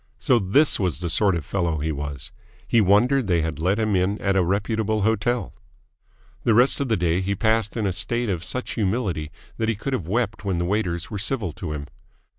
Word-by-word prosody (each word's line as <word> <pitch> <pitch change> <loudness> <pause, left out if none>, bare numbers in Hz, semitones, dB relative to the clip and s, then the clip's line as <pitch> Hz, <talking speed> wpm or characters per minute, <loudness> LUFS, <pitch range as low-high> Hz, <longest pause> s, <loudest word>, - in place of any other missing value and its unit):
So 125 - +3
this 115 +10 +3
was 90 -9 0
the 85 0 -3
sort 95 +1 +3
of 80 - -4
fellow 85 -5 -1
he 80 +2 -2
was! 70 -4 -5 0.4
He 115 - +4
wondered 115 +6 +3
they 85 -3 +2
had 80 -2 -3
let 95 +4 +2
him 110 -2 +1
in 95 +3 +1
at 100 -1 0
a 95 - +4
reputable 105 +3 0
hotel. 110 +3 0 0.9
The 115 - +3
rest 125 +4 +4
of 140 -3 -1
the 110 - +2
day 85 0 +1
he 100 +2 -1
passed 110 +1 +1
in 110 - 0
a 95 - 0
state 120 +7 -1
of 90 -5 -2
such 125 +7 -4
humility 95 -7 -1 0.3
that 110 0 0
he 115 - +1
could 135 +7 -4
have 95 -11 -2
wept 115 +2 -1
when 95 -3 -1
the 85 - -1
waiters 90 -3 -1
were 105 - -3
civil 105 -4 -1
to 80 -1 -5
him. 70 -1 -5
100 Hz, 220 wpm, -23 LUFS, 85-110 Hz, 0.9 s, He